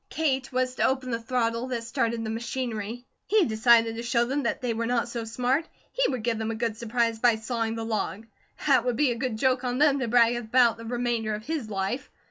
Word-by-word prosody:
Kate 270 -5 -1
was 255 0 0
to - - -1
open 260 -1 -1
the 230 0 -2
throttle 230 0 -1
that 240 -3 -3
started 230 0 -1
the 220 - -3
machinery. 235 0 -4 0.2
He 420 -3 +4
decided 225 0 +4
to - - -3
show 235 0 +1
them 275 +4 -1
that 235 - -1
they 245 -2 -1
were 230 +1 -2
not 240 -1 +1
so 235 -1 -4
smart. 250 +7 0 0.2
He - - +1
would 250 -4 -3
give 230 -1 0
them 220 0 -2
a 225 - -2
good 225 -1 -1
surprise 230 0 -1
by 235 -1 +4
sawing 225 0 -2
the 225 0 -4
log. 220 -1 -3 0.4
That - - +4
would 245 -1 0
be 275 +1 +2
a 255 +2 -1
joke 255 +3 +1
on 250 0 -1
them 285 -1 +4
to 255 - -1
brag 235 0 +4
about 240 0 +3
the 230 - -9
remainder 235 -2 -1
of 215 +1 -9
his 300 -8 -3
life. 195 +6 -3
235 Hz, 230 wpm, -26 LUFS, 225-255 Hz, 0.4 s, He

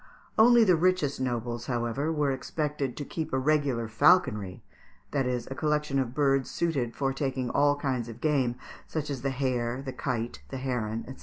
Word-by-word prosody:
Only 235 +1 +7
the 185 -5 +5
richest 165 -5 +1
nobles, 120 -2 -2
however, 120 +4 -1
were 150 -3 +1
expected 145 -1 -3
to 145 - -4
keep 160 +2 -4
a 130 - +1
regular 135 -4 +1
falconry, 110 - +3 0.5
that 135 -3 0
is, 125 -2 -2
a - - 0
collection 150 -1 0
of 130 -1 -2
birds 135 -2 +2
suited 140 -9 -1
for 135 -1 0
taking 130 -2 -2
all 145 0 +3
kinds 130 -5 -2
of 115 0 -9
game, 135 -5 +1 0.3
such 150 -2 -3
as 135 -3 -4
the 135 - 0
hare, 125 -2 -1
the 130 -2 -5
kite, 120 -3 -3
the 135 - -5
heron, 120 -4 -2
&c. 130 - -8
135 Hz, 180 wpm, -28 LUFS, 120-150 Hz, 0.5 s, Only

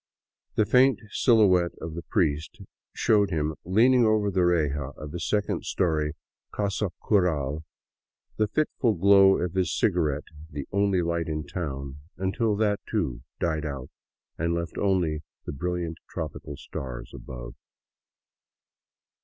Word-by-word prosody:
The 110 - +3
faint 130 +1 +5
silhouette 95 -8 +4
of 80 0 -6
the 85 - -5
priest 75 -2 -1 0.3
showed 105 -3 +3
him 80 -2 -1
leaning 120 +7 +4
over 110 -2 +3
the 90 -1 +2
reja 75 -5 +1
of 75 -1 -7
his 85 -1 -4
second 105 -1 0
story 75 -4 0 0.4
casa 100 0 -1 0.2
curd, 80 -8 +2 0.8
the 110 - +2
fitful 120 -2 +1
glow 95 +1 +6
of 90 -1 -2
his 95 -2 +1
ciga 90 -5 +2
rette 75 0 -2 0.2
the 70 -3 -6
only 100 -2 +2
light 85 0 -1
in 75 -1 -3
town, 70 -4 -5 0.2
until 100 +4 0
that, 105 -1 +1
too, 75 - -1 0.2
died 80 -2 0
out 70 -4 -5 0.5
and 85 +1 +1
left 85 0 -3
only 90 -6 +1 0.2
the - - -4
brilliant 85 +2 -3
tropical 75 -3 -6
stars 65 -3 -7
above. - - -8
85 Hz, 135 wpm, -27 LUFS, 75-100 Hz, 0.8 s, glow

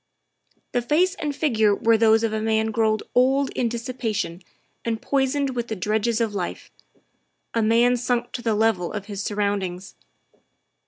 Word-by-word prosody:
The 245 - +1
face 330 +9 +2
and 295 -7 -4
figure 220 -9 +2
were 230 +2 +3
those 220 0 +4
of 225 -1 0
a 215 - -1
man 220 0 +1
grown 220 -1 +2 0.2
old 265 +2 +3
in 240 - -1
dissipation 225 -6 -3 0.4
and 225 -1 -2
poisoned 275 +1 0
with 240 -2 -3
the 220 - -3
dregs 215 +4 0
of 225 -3 0
life 185 -3 -5 0.8
a 230 - +1
man 235 +3 +4
sunk 245 0 -1
to 245 - -5
the 225 -2 0
level 210 -5 +1
of 205 -2 -5
his 200 -1 -5
surroundings. 200 -3 -2
225 Hz, 160 wpm, -23 LUFS, 210-245 Hz, 0.8 s, those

